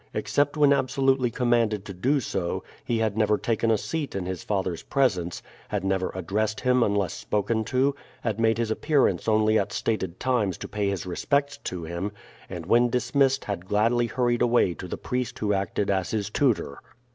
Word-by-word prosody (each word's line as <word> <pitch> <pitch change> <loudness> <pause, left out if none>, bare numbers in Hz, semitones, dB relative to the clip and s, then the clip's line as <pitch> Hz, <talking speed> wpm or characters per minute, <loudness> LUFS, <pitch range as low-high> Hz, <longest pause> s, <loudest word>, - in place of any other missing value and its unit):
Except 145 +1 0
when 145 -1 +6
absolutely 135 -1 +2
commanded 115 -4 +1
to 100 - -7
do 130 +11 +1
so, 95 -7 -3 0.2
he 120 - -1
had 110 -2 0
never 105 -1 +2
taken 115 0 0
a 110 - +4
seat 155 +2 -4
in 95 -2 -2
his 90 -1 -4
father's 95 -4 -2
presence, 95 -11 0 0.3
had - - -2
never 95 -1 0
addressed 105 +4 -1
him 125 0 +3
unless 100 -4 +1
spoken 110 +2 -1
to, 130 +4 +2 0.3
had 110 -2 -2
made 115 -1 +3
his 115 -2 -1
appearance 145 +3 +1
only 110 0 +4
at 100 - -2
stated 95 -6 -2
times 115 -8 0
to - - -7
pay 105 -2 -1
his 95 -4 -3
respects 140 +10 0
to 90 -2 -5
him, 85 +5 -4 0.4
and 85 -3 -6
when 120 +6 +4
dismissed 130 +3 +1
had 95 -3 -4
gladly 115 +4 +2
hurried 120 +1 0
away 120 -7 +3
to 90 - -8
the - - -5
priest 125 -2 -3
who 105 -1 0
acted 100 +1 -1
as 95 -1 0
his 105 -2 -2
tutor. 110 - 0
110 Hz, 185 wpm, -26 LUFS, 95-125 Hz, 0.4 s, when